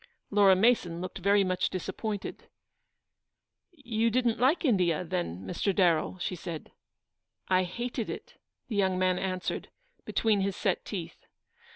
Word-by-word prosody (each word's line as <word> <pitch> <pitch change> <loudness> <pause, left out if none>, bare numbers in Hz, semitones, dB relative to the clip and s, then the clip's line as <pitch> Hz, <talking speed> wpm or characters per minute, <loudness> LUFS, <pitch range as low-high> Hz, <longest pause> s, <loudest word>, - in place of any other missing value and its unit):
" - - -48
Laura 200 -2 +6
Mason 185 -5 +2
looked 185 +1 -5
very 200 +2 +4
much 185 -1 0
disappointed. 190 +3 -5 1.2
"You 230 -8 -1
didn't 240 0 +1
like 275 +8 +3
India, 180 - +2
then, 165 - -3
Mr. 190 - -1
Darrell?" 175 -1 +2
she 180 +1 -3
said. 165 -2 -7 0.4
" - - -58 0.3
I 185 0 +3
hated 235 +4 -4
it," 485 -1 -7 0.3
the 225 - -4
young 190 -2 +2
man 185 0 +2
answered, 185 -1 -3 0.3
between 215 -3 +1
his 195 -1 -1
set - - -1
teeth. - - -7
190 Hz, 145 wpm, -29 LUFS, 180-225 Hz, 1.2 s, Laura